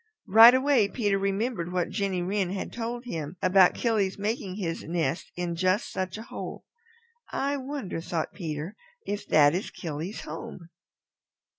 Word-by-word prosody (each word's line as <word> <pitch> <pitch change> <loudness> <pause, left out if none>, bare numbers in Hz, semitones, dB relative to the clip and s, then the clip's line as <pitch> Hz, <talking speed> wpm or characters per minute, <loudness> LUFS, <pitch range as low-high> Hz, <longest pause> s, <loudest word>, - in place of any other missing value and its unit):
Right 225 +5 +9
away 260 -5 +3
Peter 205 -3 0
remembered 195 -2 -1
what 180 -1 0
Jenny 195 -4 -1
Wren 190 0 0
had 190 +1 -4
told 240 +1 -4
him 165 -6 -5
about 185 0 +5
Killy's 210 -5 0
making 205 -2 -2
his 170 -5 -3
nest 165 -2 -2
in 175 -1 -2
just 185 +4 +1
such 185 0 -3
a 220 - -7
hole. 235 - -7 0.7
"I 280 +1 -1
wonder," 265 - -5
thought 165 -1 -3
Peter, 160 +1 -5 0.3
"if 205 0 -4
that 145 -1 +5
is 185 +4 -2
Killy's 165 +4 -5
home." 165 +2 -8
190 Hz, 150 wpm, -27 LUFS, 170-225 Hz, 0.7 s, Right